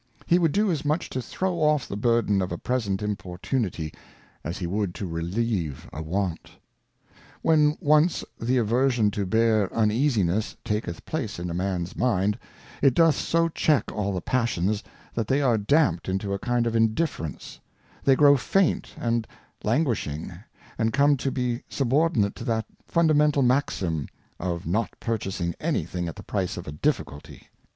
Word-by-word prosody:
He 175 - +4
would 165 -3 +3
do 205 +2 +2
as 160 - -2
much 150 +3 -1
to 130 - -2
throw 180 +8 -2
off 150 -3 +2
the - - -5
burden 110 -2 +2
of 90 - -2
a 85 - -2
present 105 -5 -1
Im 105 0 0
portunity, 90 - -3 0.5
as 85 +3 -4
he 90 - -4
would 95 0 -2
to 100 - -4
relieve 85 - -2
a 75 - -5
want. 90 +1 -2 0.9
When 150 -1 +4
once 155 +1 +3 0.2
the 125 +3 +1
Aversion 120 -1 +2
to 100 -1 -2
bear 110 -1 +2
Uneasiness 110 - +1
taketh 105 -6 -3
place - - -3
in 85 0 -4
a - - -3
Man's 90 -1 -2
Mind, 105 -4 +1 0.4
it 135 -3 +4
doth 165 -2 +5
so 165 +2 +1
check 155 -6 +1
all 100 -2 -1
the 95 -2 -2
Passions, 110 -4 0 0.3
that 115 -3 -2
they 135 - +2
are 130 -5 +3
dampt 105 - +2
into 95 +1 -1
a 100 - -2
kind 120 +1 0
of 115 0 -1
Indifference; 110 - -1 0.4
they 135 - +5
grow 145 0 +7
faint 190 +7 +1
and 115 -2 -1 0.4
languishing, 105 - -1 0.5
and 110 -1 +1
come 145 +1 +4
to 135 +1 -1
be 125 -2 -1
subordinate 135 -5 +2
to - - -6
that 115 -3 0 0.2
fundamental 150 -4 +3
Maxim, 95 - 0 0.3
of 85 -2 -3
not 105 +8 -1
purchasing 95 -6 -2
any - - 0
thing 90 -1 -4
at 80 - -6
the - - -10
price 95 -3 -2
of 90 - -7
a - - -4
Difficulty. 75 -1 -3
110 Hz, 165 wpm, -25 LUFS, 95-140 Hz, 0.9 s, grow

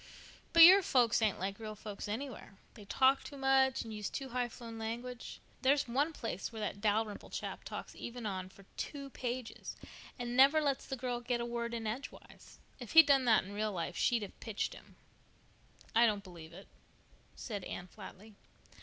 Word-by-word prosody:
"But 335 0 +9
your 375 +4 +10
folks 245 -9 +3
ain't 215 -3 +2
like 195 +2 -4
real 215 -1 -6
folks 210 -1 -7
anywhere. 220 -3 -6 0.2
They 210 - -13
talk 265 +6 +3
too 285 - -9
much 270 -1 +3
and 225 -1 -8
use 210 -1 -4
too 270 -1 -5
high 245 0 -1
flown 230 -1 -9
language. 235 +2 -6 0.2
There's 275 +1 +3
one 280 +7 +1
place 225 - -5
where 225 - -7
that 200 -1 -4
Dalrymple 215 0 0
chap - - -5
talks - - -7
even 240 -1 -7
on 185 -2 -3
for 195 +1 -18
two 280 -2 -5
pages, 250 -1 -5 0.4
and 245 -1 -4
never 275 +4 +7
lets 280 -3 -1
the 270 - -4
girl 245 -1 -3
get 240 0 -1
a 235 - -2
word 235 0 -3
in 225 -1 -4
edgewise. 240 +6 -7 0.2
If 245 -4 -8
he'd 325 -1 +10
done 275 -2 +4
that 225 -3 +5
in 195 +2 -9
real 215 +1 -1
life 175 -4 -4
she'd 235 -3 +1
have 200 - -10
pitched 220 -3 -3
him." - - -15 1.0
"I 235 +1 +6
don't 205 -2 -1
believe 170 -4 -11
it," 190 +4 -12 0.7
said 205 -6 -5
Anne 180 - -6
flatly. 205 +3 -12
235 Hz, 190 wpm, -33 LUFS, 210-260 Hz, 1.0 s, your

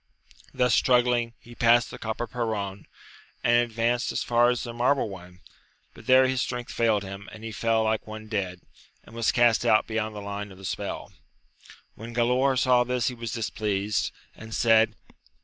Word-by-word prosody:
Thus 125 -2 +1
struggling, 120 -2 +3
he 120 - -14
passed 120 -1 +3
the - - -9
copper 110 +2 -3
perron, 105 -5 -4 0.6
and 120 0 +4
advanced 120 +1 0
as - - -2
far 120 0 +3
as 125 -1 -1
the 120 - -6
marble 125 +1 +1
one, 90 -1 -12 0.5
but - - -15
there 130 0 +6
his 130 -1 0
strength 125 -1 -4
failed 110 -3 +2
him, 95 +1 -8
and 110 - -11
he 115 - -5
fell 115 +1 +1
like 110 -1 -1
one 110 0 -8
dead, 95 -4 -3 0.4
and - - -16
was 115 -1 +1
cast 120 -2 +3
out 110 - +4
beyond 110 -1 -3
the - - -5
line 100 0 -6
of 95 - -13
the 95 - -11
spell. - - -5 0.8
When 115 +2 -10
Galaor 125 +3 +2
saw 125 0 +4
this 125 0 0
he - - -6
was 115 -2 -6
displeased, 105 -2 -1 0.2
and 110 0 -8
said. 115 -1 +4
115 Hz, 180 wpm, -26 LUFS, 110-120 Hz, 0.8 s, there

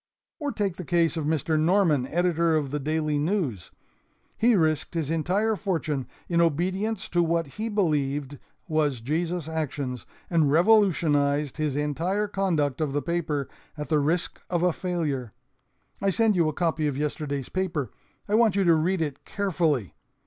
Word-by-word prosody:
"Or 290 -2 -2
take 200 -7 -2
the 180 - -5
case 170 0 +2
of 160 -3 -2
Mr. 155 0 +1
Norman, 160 -6 +3
editor 170 -1 +1
of 145 -4 -1
the 150 - -1
DAILY 150 0 0
NEWS. 150 - -1 0.7
He 235 0 +4
risked 155 -2 +1
his 160 -2 -1
entire 195 +7 +1
fortune 160 - -2 0.2
in 170 -1 +2
obedience 185 +6 0
to 175 - +2
what 165 0 +1
he 215 +11 -5
believed 145 -8 -1 0.3
was 150 -5 +1
Jesus' 165 +5 -2
action, 145 -5 -3 0.3
and 160 -5 +2
revolutionized 155 - +3
his 150 -3 -1
entire 165 +8 -1
conduct 165 -9 0
of 145 -3 -1
the 145 - 0
paper 155 -3 -1 0.3
at 150 - -5
the 155 -2 +3
risk 165 +5 -1
of 175 -1 0
a 180 -2 +3
failure. 150 - -3 0.7
I 195 - +2
send 220 +1 +3
you 170 -3 +3
a - - -4
copy 160 -2 0
of 140 -2 -2
yesterday's 145 -2 -3
paper. 165 - -2 0.4
I 205 - -3
want 220 -3 +4
you 200 - +3
to 170 -2 +5
read 165 +3 +1
it 145 -3 -5
carefully. 165 - -1
160 Hz, 165 wpm, -26 LUFS, 145-180 Hz, 0.7 s, to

